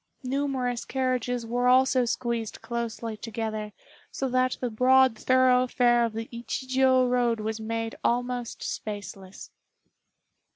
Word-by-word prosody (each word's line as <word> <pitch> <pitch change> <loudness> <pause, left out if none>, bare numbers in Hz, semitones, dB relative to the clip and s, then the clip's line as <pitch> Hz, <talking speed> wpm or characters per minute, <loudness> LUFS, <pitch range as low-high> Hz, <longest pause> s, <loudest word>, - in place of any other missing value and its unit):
Numerous 260 -2 -1
carriages 250 -2 -1
were 245 +2 0
also 255 0 +4
squeezed 235 -2 -3
closely 230 -1 -4
together, 215 -1 -4 0.4
so 270 - -3
that 255 0 +1
the 250 -2 -2
broad 255 +1 +4
thoroughfare 250 -1 +3
of 230 -2 -1
the 225 +1 -5
Ichijiô 260 +2 +1
road 245 -2 +1
was 220 +1 -3
made 225 +1 -3
almost 245 0 -1
spaceless. 200 -2 -7
245 Hz, 115 wpm, -27 LUFS, 225-255 Hz, 0.4 s, also